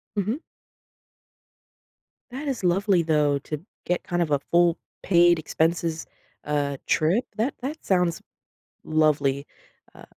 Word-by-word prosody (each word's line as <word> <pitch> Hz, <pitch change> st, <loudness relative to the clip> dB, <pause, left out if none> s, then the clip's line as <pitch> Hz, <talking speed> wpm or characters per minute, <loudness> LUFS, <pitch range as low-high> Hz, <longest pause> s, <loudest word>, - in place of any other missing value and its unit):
Mhm. 215 Hz, -, -1 dB, 1.9 s
That 280 Hz, +4 st, -6 dB
is 260 Hz, -7 st, -3 dB
lovely, 185 Hz, 0 st, +3 dB
though, 150 Hz, -3 st, +2 dB
to 150 Hz, +4 st, -7 dB, 0.2 s
get 180 Hz, 0 st, -1 dB
kind 175 Hz, 0 st, -1 dB
of 155 Hz, -, -1 dB
a 145 Hz, -, +3 dB
full 170 Hz, +3 st, +2 dB, 0.3 s
paid 175 Hz, -2 st, +5 dB
expenses 165 Hz, +1 st, -1 dB, 0.4 s
uh, 145 Hz, -1 st, -1 dB
trip, 180 Hz, +11 st, +2 dB
that 240 Hz, +6 st, 0 dB
that 285 Hz, +5 st, -5 dB
sounds 180 Hz, -3 st, +1 dB, 0.6 s
lovely, 150 Hz, -3 st, +1 dB, 0.5 s
uh. -, -, -13 dB
170 Hz, 120 wpm, -25 LUFS, 155-195 Hz, 1.9 s, paid